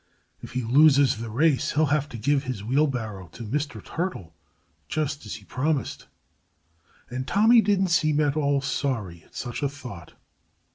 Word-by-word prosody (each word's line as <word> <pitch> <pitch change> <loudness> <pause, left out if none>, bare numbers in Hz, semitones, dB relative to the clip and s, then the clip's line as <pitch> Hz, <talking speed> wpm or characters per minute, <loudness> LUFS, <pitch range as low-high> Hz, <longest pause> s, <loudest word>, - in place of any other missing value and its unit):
"If - - -10
he 130 -1 -1
loses 140 +1 +5
the 115 0 -5
race, 145 +5 +2
he'll 155 +1 +3
have 150 -1 0
to 120 - -7
give 140 +5 +1
his 125 -6 -4
wheelbarrow 115 - -1
to 120 - -8
Mr. 145 +6 -3
Turtle, 160 - -4 0.5
just 150 -2 -2
as - - -5
he - - -11
promised." 145 +2 -2 1.0
And 130 +1 -4
Tommy 225 +3 +5
didn't 195 -3 +2
seem 155 -3 +2
at 145 -1 +2
all 140 -2 +1
sorry 115 -11 -2
at - - -24
such 120 +2 -5
a 140 - +1
thought. 125 - -10
140 Hz, 160 wpm, -25 LUFS, 120-155 Hz, 1.0 s, loses